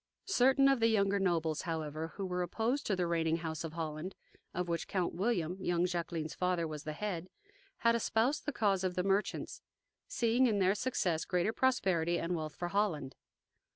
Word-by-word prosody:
Certain 270 Hz, -6 st, +4 dB
of 275 Hz, -2 st, +4 dB
the 225 Hz, -, +4 dB
younger 200 Hz, -2 st, +2 dB
nobles, 165 Hz, -5 st, +1 dB
however, 160 Hz, -1 st, -4 dB
who 195 Hz, -, -3 dB
were 180 Hz, -1 st, -2 dB
opposed 225 Hz, -, -1 dB
to 200 Hz, -, +2 dB
the 180 Hz, -1 st, 0 dB
reigning 165 Hz, -1 st, +1 dB
house 160 Hz, -1 st, -4 dB
of 160 Hz, -1 st, -5 dB
Holland, 160 Hz, +2 st, -4 dB, 0.4 s
of 180 Hz, 0 st, -2 dB
which 170 Hz, -1 st, -2 dB
Count 185 Hz, -3 st, -1 dB
William, 180 Hz, -2 st, 0 dB
young 175 Hz, -1 st, +1 dB
Jacqueline's 170 Hz, -3 st, -3 dB
father, 180 Hz, -2 st, 0 dB
was 155 Hz, -1 st, -7 dB
the 155 Hz, -, -3 dB
head, 185 Hz, 0 st, -4 dB, 0.5 s
had 230 Hz, 0 st, +3 dB
espoused 235 Hz, +5 st, +1 dB
the -, -, +1 dB
cause 200 Hz, -7 st, +1 dB
of 185 Hz, -1 st, -1 dB
the 180 Hz, -, 0 dB
merchants, 195 Hz, +2 st, -1 dB, 0.5 s
seeing 240 Hz, +2 st, +2 dB
in 215 Hz, -3 st, +1 dB
their 190 Hz, 0 st, +4 dB
success 190 Hz, -8 st, 0 dB
greater 180 Hz, +4 st, 0 dB
prosperity 185 Hz, -11 st, +2 dB
and 175 Hz, +1 st, -1 dB
wealth 155 Hz, -2 st, -4 dB
for 175 Hz, -, -3 dB
Holland. 175 Hz, -9 st, 0 dB
180 Hz, 185 wpm, -33 LUFS, 165-210 Hz, 0.5 s, Certain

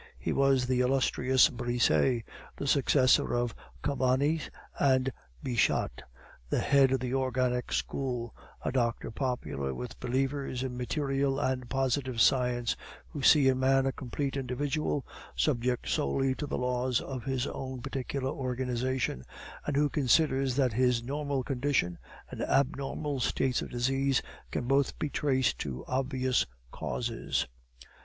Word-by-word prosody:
He -, -, -2 dB
was 135 Hz, -2 st, +3 dB
the 125 Hz, 0 st, +1 dB
illustrious 130 Hz, 0 st, +3 dB
Brisset, 120 Hz, 0 st, +1 dB, 0.3 s
the -, -, -5 dB
successor 135 Hz, -3 st, +3 dB
of 120 Hz, -2 st, 0 dB, 0.3 s
Cabanis 140 Hz, +4 st, +1 dB, 0.3 s
and 130 Hz, -1 st, +3 dB, 0.3 s
Bichat, 115 Hz, -, +1 dB, 0.5 s
head 140 Hz, -2 st, +4 dB
of 135 Hz, -, +2 dB
the 125 Hz, +1 st, -3 dB
Organic 125 Hz, -, 0 dB
School, 120 Hz, -, -2 dB, 0.3 s
a -, -, +1 dB
doctor 120 Hz, -4 st, 0 dB
popular 110 Hz, -, -2 dB
with 60 Hz, 0 st, -7 dB
believers 135 Hz, 0 st, -1 dB
in 130 Hz, -2 st, -4 dB
material 135 Hz, +1 st, 0 dB
and 130 Hz, -3 st, -1 dB
positive 130 Hz, -2 st, 0 dB
science, 125 Hz, -1 st, +3 dB, 0.3 s
who 145 Hz, -, -6 dB
see 140 Hz, 0 st, +6 dB
in 130 Hz, -1 st, +3 dB
man 135 Hz, 0 st, +3 dB
a 135 Hz, -, +1 dB
complete 135 Hz, +2 st, -4 dB
individual, 140 Hz, +2 st, -1 dB, 0.3 s
subject 125 Hz, -4 st, 0 dB
solely 130 Hz, -, +1 dB
to 145 Hz, +2 st, -5 dB
the -, -, -2 dB
laws 125 Hz, 0 st, 0 dB
of 130 Hz, -3 st, -6 dB
his 135 Hz, -1 st, -1 dB
own 130 Hz, -2 st, -5 dB
particular 135 Hz, 0 st, -3 dB
organization; 125 Hz, -, -2 dB, 0.4 s
and 145 Hz, -, 0 dB
who 150 Hz, +1 st, +4 dB
consider 135 Hz, -1 st, +2 dB
that 130 Hz, -2 st, +1 dB
his 125 Hz, 0 st, +2 dB
normal 140 Hz, 0 st, -2 dB
condition 125 Hz, -, 0 dB, 0.3 s
and -, -, -6 dB
abnormal 140 Hz, +1 st, 0 dB
states 125 Hz, +1 st, +1 dB
of -, -, -6 dB
disease 135 Hz, +2 st, +1 dB, 0.3 s
can 120 Hz, -, -3 dB
both 135 Hz, +2 st, +2 dB
be 150 Hz, -, -2 dB
traced 130 Hz, -5 st, +1 dB
to 65 Hz, -2 st, -5 dB
obvious 130 Hz, -1 st, 0 dB, 0.2 s
causes. 115 Hz, -2 st, -2 dB
130 Hz, 135 wpm, -30 LUFS, 125-135 Hz, 0.5 s, see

